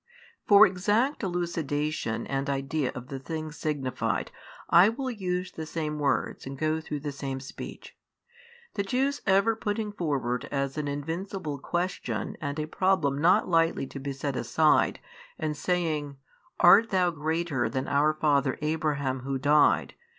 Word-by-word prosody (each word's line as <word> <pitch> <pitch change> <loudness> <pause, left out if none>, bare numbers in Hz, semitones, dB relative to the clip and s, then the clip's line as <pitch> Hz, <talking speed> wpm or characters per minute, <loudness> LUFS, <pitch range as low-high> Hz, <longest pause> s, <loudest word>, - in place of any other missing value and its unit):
For 205 +1 +9
exact 210 +10 +1
elucidation 155 - -2
and 135 +1 -2
idea 140 +1 -1
of 125 +2 -8
the 135 -2 -5
things 155 +3 -5
signified 140 -5 -2 0.4
I 175 +5 +7
will 260 +3 -3
use 185 -4 -3
the 160 -2 -7
same 155 -2 -3
words 140 -2 -1
and 135 0 -6
go 155 +2 0
through 150 -2 -5
the 145 0 -3
same 135 -1 -4
speech. 135 - -9 0.8
The 200 - -1
Jews 265 +7 0
ever 195 +4 +4
putting 210 0 -2
forward 140 - -2
as 140 -1 -1
an 150 -2 -2
invincible 160 +2 -4
question 175 +6 -3
and 145 -1 -3
a 155 - -1
problem 155 -5 +1
not 175 +3 +4
lightly 165 -4 +2
to 135 - -8
be 140 +1 -4
set 135 0 -3
aside 155 +3 +2 0.4
and 155 -1 -2
saying, 155 -4 -1 0.4
Art 210 +6 +7
THOU 180 -2 +2
greater 160 -4 -1
than 130 0 -3
our 150 +2 +2
father 140 -4 +2
Abraham 150 -4 -1
who 135 +1 -3
died? 145 +3 +3
155 Hz, 150 wpm, -27 LUFS, 140-180 Hz, 0.8 s, For